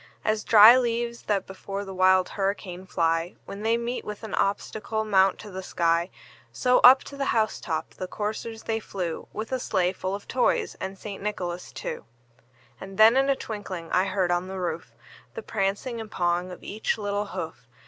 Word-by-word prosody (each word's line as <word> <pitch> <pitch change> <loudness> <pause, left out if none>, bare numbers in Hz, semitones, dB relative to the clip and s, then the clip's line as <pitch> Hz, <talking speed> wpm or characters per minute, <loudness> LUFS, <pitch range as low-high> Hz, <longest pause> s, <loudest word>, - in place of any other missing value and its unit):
As 215 0 +1
dry 225 +3 +9
leaves 235 -1 -1
that 200 -3 +1
before 195 +1 -6
the 195 - -7
wild 185 0 +4
hurricane 195 -2 -3
fly, 165 -1 0
When 200 - -8
they 225 +2 +2
meet 235 +1 -3
with 210 +1 -7
an 220 - -6
obstacle, 215 +2 -1
mount 195 -2 +4
to 210 - -10
the 190 0 -5
sky, 170 -1 +1 0.4
So, 250 -1 +3
up 260 +2 +8
to 280 - -10
the 275 0 -2
house 215 -1 0
top 160 -3 -3
the 185 - -6
coursers 220 +3 -4
they 225 0 -1
flew, 180 -6 -5
With 220 +3 -5
a 260 - 0
sleigh 185 -6 0
full 190 +1 -3
of 200 - -10
toys 250 0 +1
and 190 +1 -5
St. 200 0 -7
Nicholas 180 -4 -4
too. 115 -2 -6 0.7
And 195 0 -9
then 220 +2 +7
in 270 +1 +3
a 275 - +4
twinkling 190 -8 -6
I 185 +1 +3
heard 190 -2 0
on 175 +1 0
the 190 0 -5
roof, 170 -2 -4 0.4
The 460 - -6
prancing 215 +4 -2
and 220 - -8
pawing 175 -1 0
of 180 - -10
each 215 +2 -2
little 205 -1 -2
hoof. 160 -10 -6
200 Hz, 190 wpm, -26 LUFS, 185-220 Hz, 0.7 s, dry